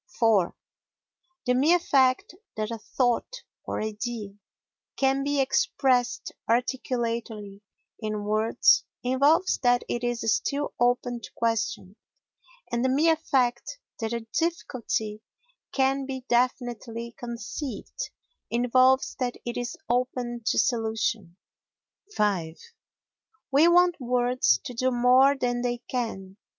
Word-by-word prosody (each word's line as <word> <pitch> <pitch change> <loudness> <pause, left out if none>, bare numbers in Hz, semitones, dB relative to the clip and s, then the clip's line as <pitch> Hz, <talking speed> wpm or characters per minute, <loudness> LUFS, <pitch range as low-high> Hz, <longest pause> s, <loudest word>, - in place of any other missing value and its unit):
iv 210 -6 +4 0.9
The 250 - +3
mere 300 +8 +4
fact 265 -6 +2 0.2
that 215 +1 -2
a 230 - -4
thought 255 - -1 0.2
or - - -4
idea 215 -1 -4 0.6
can 270 0 +2
be 285 0 0
expressed 260 -3 +1 0.2
articulately 230 -4 -2 0.4
in 215 -2 -3
words 210 -2 +3 0.2
involves 280 +8 +3
that 245 -1 +3
it 240 - -3
is 240 -1 -1
still 285 +5 -2
open 245 0 +1
to - - -9
question; 215 -3 -2 0.7
and 235 +1 0
the 260 - +2
mere 315 +5 +4
fact 255 - 0 0.2
that 225 -1 -2
a 235 -1 -3
difficulty 235 -10 -2 0.5
can 270 0 +1
be 260 -2 -6
definitely 240 -1 -1
conceived 240 - -6 0.4
involves 255 +2 +3
that 250 -2 -1
it 240 - -3
is 245 0 -4
open 245 -1 -1
to - - +2
solution. 220 -5 0 0.8
v 180 -6 0 0.9
We 290 +5 +6
want 350 0 +5
words 245 - +2
to 250 - -6
do 255 +2 +1
more 255 +3 +5
than 245 -2 -1
they 245 0 -1
can. 220 -6 -5
245 Hz, 115 wpm, -26 LUFS, 225-260 Hz, 0.9 s, We